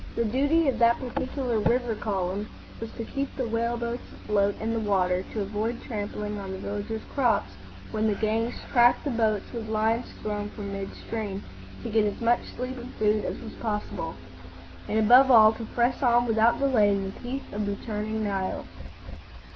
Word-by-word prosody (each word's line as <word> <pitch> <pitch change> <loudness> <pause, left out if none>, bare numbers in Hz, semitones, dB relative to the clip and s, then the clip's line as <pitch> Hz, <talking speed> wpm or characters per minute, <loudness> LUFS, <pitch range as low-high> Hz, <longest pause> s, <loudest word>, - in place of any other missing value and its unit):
The 235 - +1
duty 285 +8 +2
of 270 - +1
that 235 0 +5
particular 255 -1 -2
river 240 +2 +2
column 200 -1 -2 0.3
was 225 0 -6
to 230 - -5
keep 275 +3 -4
the 255 -3 -2
whale 230 +1 0
boats 235 +1 -3
afloat 205 -1 0
in 225 +1 -1
the 230 - 0
water, 185 -3 +1
to 215 - -2
avoid 215 +4 -2
trampling 210 -1 -4
on 195 -1 -6
the 190 - -4
villagers' 205 +3 -4
crops 235 - +2 0.4
when 220 0 +1
the 210 - +1
gangs 225 +3 0 0.2
"tracked' 240 -1 +5
the 285 - -1
boats 220 -3 0
with 225 -2 -5
lines 220 +2 +1 0.2
thrown 210 -1 -2
from 200 -2 -6
midstream, 200 +1 -5 0.4
to - - -4
get 220 0 +4
as - - -10
much 235 +1 +3 0.2
sleep 255 +1 -4
and 245 +1 -8
food 215 0 +2
as - - -3
was 225 - -8
possible, 210 -7 -3 0.7
and, 215 - +1
above 245 +5 +7
all, 220 -3 +8
to 225 - -6
press 240 +2 0
on 240 -2 +4
without 225 +1 +3
delay 255 -7 +4
in 200 -1 +1
the 195 - -7
teeth 260 +3 -6
of 205 0 -2
the 200 - -1
churning 215 0 -2
Nile. 195 -2 -2
220 Hz, 185 wpm, -27 LUFS, 205-240 Hz, 0.7 s, all